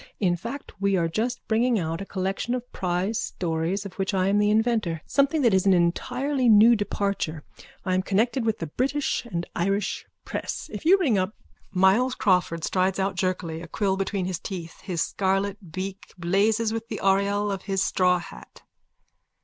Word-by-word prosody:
In 180 Hz, -4 st, +2 dB
fact 235 Hz, +10 st, -7 dB
we 200 Hz, 0 st, +2 dB
are 170 Hz, -2 st, +1 dB
just 230 Hz, +9 st, -2 dB
bringing 235 Hz, +2 st, +2 dB
out 165 Hz, -1 st, -2 dB
a 195 Hz, -, -6 dB
collection 195 Hz, +5 st, -2 dB
of 245 Hz, 0 st, -7 dB
prize 185 Hz, +5 st, -1 dB
stories 170 Hz, +3 st, -2 dB
of 195 Hz, -, -7 dB
which 195 Hz, +1 st, 0 dB
I 185 Hz, 0 st, +2 dB
am 205 Hz, +1 st, +3 dB
the 210 Hz, 0 st, +3 dB
inventor, 215 Hz, -7 st, +1 dB
something 280 Hz, +2 st, +2 dB
that 235 Hz, -4 st, +4 dB
is 190 Hz, +1 st, +3 dB
an 190 Hz, -, +6 dB
entirely 250 Hz, +10 st, +1 dB
new 220 Hz, +2 st, +7 dB
departure. 200 Hz, -7 st, -2 dB, 0.4 s
I 185 Hz, -, 0 dB
am 185 Hz, -, +2 dB
connected 225 Hz, +6 st, +1 dB
with 220 Hz, -1 st, 0 dB
the 165 Hz, -, -4 dB
British 270 Hz, -, -1 dB
and 175 Hz, -6 st, -3 dB
Irish 195 Hz, +4 st, -1 dB, 0.2 s
press. -, -, -5 dB
If -, -, -6 dB
you 370 Hz, +4 st, +7 dB
ring 265 Hz, -, +2 dB
up... 185 Hz, +4 st, -2 dB, 0.4 s
_(Myles 200 Hz, +8 st, +3 dB
Crawford 180 Hz, -4 st, +1 dB
strides 185 Hz, +2 st, +1 dB
out 195 Hz, 0 st, 0 dB
jerkily, 180 Hz, -3 st, -2 dB
a 170 Hz, -, -8 dB
quill 195 Hz, +1 st, 0 dB
between 195 Hz, -1 st, -2 dB
his 180 Hz, -2 st, -3 dB
teeth. 170 Hz, -4 st, -7 dB
His 175 Hz, -4 st, -1 dB
scarlet 195 Hz, -1 st, -1 dB
beak 195 Hz, +3 st, -6 dB
blazes 210 Hz, +6 st, +1 dB
within 225 Hz, 0 st, -4 dB
the 215 Hz, -, -4 dB
aureole 200 Hz, +1 st, +2 dB
of 195 Hz, -1 st, -3 dB
his 195 Hz, -1 st, +1 dB
straw 180 Hz, -1 st, +3 dB
hat. -, -, -11 dB
195 Hz, 180 wpm, -25 LUFS, 180-220 Hz, 0.4 s, new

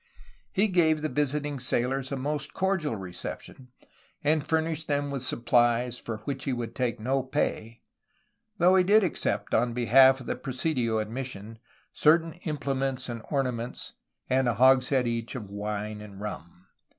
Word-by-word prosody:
He 210 Hz, +2 st, +2 dB
gave 160 Hz, -5 st, +2 dB
the 155 Hz, -, 0 dB
visiting 145 Hz, -1 st, -1 dB
sailors 125 Hz, +2 st, 0 dB
a 140 Hz, -, -2 dB
most 145 Hz, +2 st, -3 dB
cordial 190 Hz, -9 st, 0 dB
reception, 95 Hz, +6 st, -7 dB, 0.6 s
and 150 Hz, 0 st, +2 dB
furnished 160 Hz, 0 st, -1 dB
them 145 Hz, -1 st, -1 dB
with 135 Hz, -2 st, -3 dB
supplies 120 Hz, 0 st, +2 dB
for 110 Hz, -2 st, -6 dB
which 135 Hz, -2 st, -3 dB
he 135 Hz, -, 0 dB
would 120 Hz, -2 st, -4 dB
take 120 Hz, -2 st, -2 dB
no 130 Hz, +5 st, 0 dB
pay, 120 Hz, -4 st, -3 dB, 0.7 s
though 180 Hz, +1 st, +5 dB
he 185 Hz, -, +5 dB
did 210 Hz, +3 st, +5 dB
accept 105 Hz, -, -1 dB
on 120 Hz, +1 st, +2 dB
behalf 130 Hz, +3 st, +5 dB
of 130 Hz, -, -10 dB
the -, -, -2 dB
presidio 125 Hz, -4 st, -1 dB
and 110 Hz, 0 st, -3 dB
mission 115 Hz, -4 st, -6 dB, 0.3 s
certain 165 Hz, +1 st, +3 dB
implements 135 Hz, -4 st, -2 dB
and 115 Hz, -1 st, -5 dB
ornaments 125 Hz, -4 st, -3 dB, 0.3 s
and 130 Hz, 0 st, +2 dB
a 120 Hz, -, +1 dB
hogshead 130 Hz, +1 st, +4 dB
each 115 Hz, 0 st, -3 dB
of 105 Hz, -6 st, -7 dB
wine 105 Hz, +1 st, -4 dB
and 100 Hz, -2 st, -11 dB
rum. 90 Hz, -3 st, -8 dB
130 Hz, 155 wpm, -27 LUFS, 115-145 Hz, 0.7 s, though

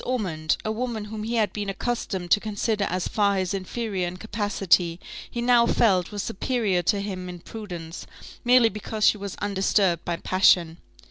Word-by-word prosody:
Ormond, 180 Hz, -11 st, -1 dB
a 215 Hz, -, 0 dB
woman 225 Hz, -1 st, -3 dB
whom 215 Hz, 0 st, -6 dB
he 225 Hz, +2 st, -2 dB
had 220 Hz, -2 st, +1 dB
been 205 Hz, -1 st, -3 dB
accustomed 195 Hz, -4 st, -3 dB
to 210 Hz, -, +6 dB
consider 210 Hz, 0 st, -1 dB
as 180 Hz, 0 st, -2 dB
far 200 Hz, -2 st, +1 dB
his 185 Hz, 0 st, -1 dB
inferior 195 Hz, -1 st, -3 dB
in 175 Hz, +1 st, -6 dB
capacity, 195 Hz, -5 st, +1 dB, 0.3 s
he 235 Hz, -, -4 dB
now 240 Hz, -1 st, +5 dB
felt 190 Hz, -8 st, +2 dB
was 205 Hz, -1 st, -3 dB
superior 205 Hz, -4 st, 0 dB
to 200 Hz, +3 st, +1 dB
him 185 Hz, -3 st, -5 dB
in 180 Hz, -, -7 dB
prudence, 175 Hz, -5 st, -8 dB, 0.4 s
merely 245 Hz, -1 st, +5 dB
because 215 Hz, +1 st, -2 dB
she 210 Hz, -, +4 dB
was 200 Hz, -1 st, -5 dB
undisturbed 195 Hz, -3 st, +1 dB
by 170 Hz, -, -2 dB
passion. 175 Hz, -2 st, +3 dB
200 Hz, 175 wpm, -25 LUFS, 180-220 Hz, 0.4 s, to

